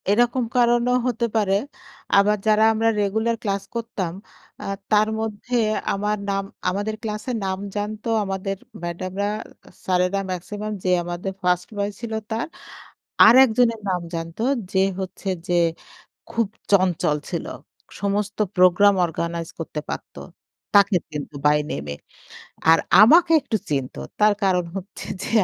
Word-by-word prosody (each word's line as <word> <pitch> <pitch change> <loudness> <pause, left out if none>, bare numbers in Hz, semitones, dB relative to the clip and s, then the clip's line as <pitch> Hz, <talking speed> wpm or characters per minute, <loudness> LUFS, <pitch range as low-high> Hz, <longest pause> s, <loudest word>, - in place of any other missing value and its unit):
এরকম 240 +4 +3
কারণেও 240 +1 +3
হতে 235 -1 0
পারে। 205 -3 +2 0.6
আবার 210 +1 +4
যারা 215 0 +5
আমরা 225 +1 +2
রেগুলার 220 +3 0
ক্লাস 200 -2 -1
করতাম 215 -7 -3 0.5
আ - - -6 0.3
তার 215 0 +5
মধ্যে 220 +2 -4 0.4
আমরা 210 +1 -1 0.2
নাম, 195 0 0 0.3
আমাদের 205 +3 -2
ক্লাসের 215 +3 -3
নাম 190 0 -2 0.2
জানতো 210 +2 -3
আমাদের 195 0 -3 0.3
ম্যাডামরা, 185 +3 -3 0.6
স্যারেরা 180 +1 +1
মেক্সিমাম 205 +4 -5
যে 185 - 0
আমাদের 175 +2 -4
ফার্স্ট 180 -1 +1
বয় 200 0 -1
ছিল 230 -1 -5 0.2
তার। 225 +1 -1 0.8
আরেকজনের 235 -1 +5
নাম 180 -1 0
জানত 165 0 -5 0.3
যে 190 - +1 0.2
হচ্ছে 190 +1 -6 0.2
যে 175 - +1 0.8
খুব 230 -2 +1 0.2
চঞ্চল 180 -6 +3
ছিল। - - -3 0.5
সমস্ত 205 +1 -1 0.2
প্রোগ্রাম 185 +2 +6
অর্গানাইজ 170 0 -4
করতে 160 -2 -4
পারত। - - -6 0.6
তাকে 200 -2 +5
কিন্তু 150 -1 -6
বাই 150 0 +5
নেম 70 - -4
এ। - - -7 0.8
আর 165 - +6 0.2
আমাকে 325 +10 +7
একটু 220 - -1
চিনত। 135 -3 -2 0.2
তার 210 0 +5
কারণ 180 -2 +2
হচ্ছে 195 0 -7 0.2
যে - - -4
200 Hz, 130 wpm, -23 LUFS, 180-220 Hz, 0.8 s, আমাকে